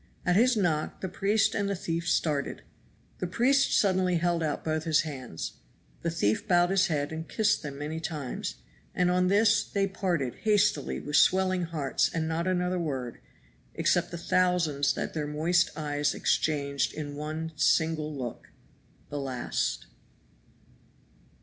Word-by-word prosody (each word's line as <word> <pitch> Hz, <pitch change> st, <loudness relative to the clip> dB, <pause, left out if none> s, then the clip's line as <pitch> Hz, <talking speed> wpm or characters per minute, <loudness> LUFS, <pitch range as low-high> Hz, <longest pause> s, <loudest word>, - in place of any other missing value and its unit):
At 180 Hz, -, +3 dB
his 240 Hz, +3 st, +4 dB
knock 160 Hz, -6 st, 0 dB
the 190 Hz, -, -2 dB
priest 200 Hz, +4 st, +1 dB
and 200 Hz, -1 st, -1 dB
the 200 Hz, -, 0 dB
thief 170 Hz, -1 st, -3 dB
started. 150 Hz, -4 st, 0 dB, 0.6 s
The 180 Hz, -, -2 dB
priest 260 Hz, +9 st, +3 dB
suddenly 185 Hz, -3 st, +2 dB
held 170 Hz, 0 st, 0 dB
out 155 Hz, -2 st, -2 dB
both 155 Hz, 0 st, -1 dB
his 155 Hz, -2 st, +3 dB
hands; 130 Hz, -, -6 dB, 0.4 s
the 170 Hz, -, -1 dB
thief 165 Hz, -, 0 dB
bowed 175 Hz, -1 st, +4 dB
his 195 Hz, -1 st, +3 dB
head 145 Hz, -3 st, -1 dB
and 160 Hz, +1 st, -6 dB
kissed 220 Hz, -1 st, +2 dB
them 140 Hz, -2 st, -6 dB
many 150 Hz, +3 st, -4 dB
times, 150 Hz, -6 st, -4 dB, 0.4 s
and 180 Hz, 0 st, +2 dB
on 180 Hz, 0 st, +2 dB
this 205 Hz, +3 st, +4 dB
they 200 Hz, -1 st, -1 dB
parted 180 Hz, -, -2 dB
hastily 210 Hz, -9 st, +2 dB
with 150 Hz, -, 0 dB
swelling 185 Hz, -1 st, +3 dB
hearts 140 Hz, -5 st, 0 dB
and 160 Hz, -1 st, -2 dB
not 165 Hz, +2 st, -1 dB
another 180 Hz, 0 st, 0 dB
word 130 Hz, -7 st, -4 dB, 0.6 s
except -, -, +1 dB
the 170 Hz, -, -6 dB
thousands 170 Hz, -5 st, +2 dB
that -, -, -3 dB
their 150 Hz, -2 st, -2 dB
moist 165 Hz, +4 st, +2 dB
eyes 145 Hz, -1 st, -1 dB
exchanged 140 Hz, -2 st, 0 dB
in 145 Hz, -2 st, -5 dB
one 155 Hz, +2 st, -4 dB
single 155 Hz, 0 st, +2 dB
look 130 Hz, -5 st, -6 dB, 0.6 s
the 145 Hz, -, -4 dB
last. 130 Hz, -3 st, -2 dB
165 Hz, 150 wpm, -28 LUFS, 150-185 Hz, 0.6 s, his